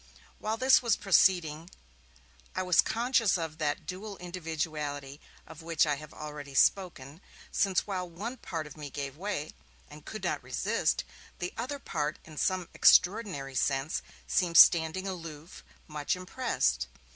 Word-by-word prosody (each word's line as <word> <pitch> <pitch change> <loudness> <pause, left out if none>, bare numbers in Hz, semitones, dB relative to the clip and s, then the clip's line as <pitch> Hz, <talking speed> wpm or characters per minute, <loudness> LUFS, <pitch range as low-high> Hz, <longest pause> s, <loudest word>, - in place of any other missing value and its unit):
While 220 +1 -2
this 260 +2 +5
was 235 -4 +2
proceeding, 175 -4 +3 0.9
I 185 - 0
was 180 -1 +5
conscious 230 -3 +2
of 160 -2 -5
that 145 -2 -1
dual 200 +2 -6
individuality 155 -5 -4 0.2
of 160 0 -12
which 165 -1 +2
I 145 -2 0
have 155 +1 -11
already 150 -2 -8
spoken, 165 -4 +1 0.3
since 195 -3 +1
while 185 -3 -3
one 215 +10 -6
part 165 -8 -5
of 150 - -11
me 150 -2 -7
gave 140 -1 -5
way, 170 -3 -4 0.4
and - - -12
could - - -8
not - - -1
resist, - - 0 0.3
the 180 0 -4
other 255 +5 -4
part 150 - -3
in 155 - -12
some 185 0 0
extraordinary 180 -9 +4
sense 135 +3 0 0.2
seemed 170 -2 +1
standing 170 +4 +6
aloof, 165 -3 -8 0.2
much 150 +1 -2
impressed. 180 - -1
165 Hz, 145 wpm, -30 LUFS, 150-190 Hz, 0.9 s, standing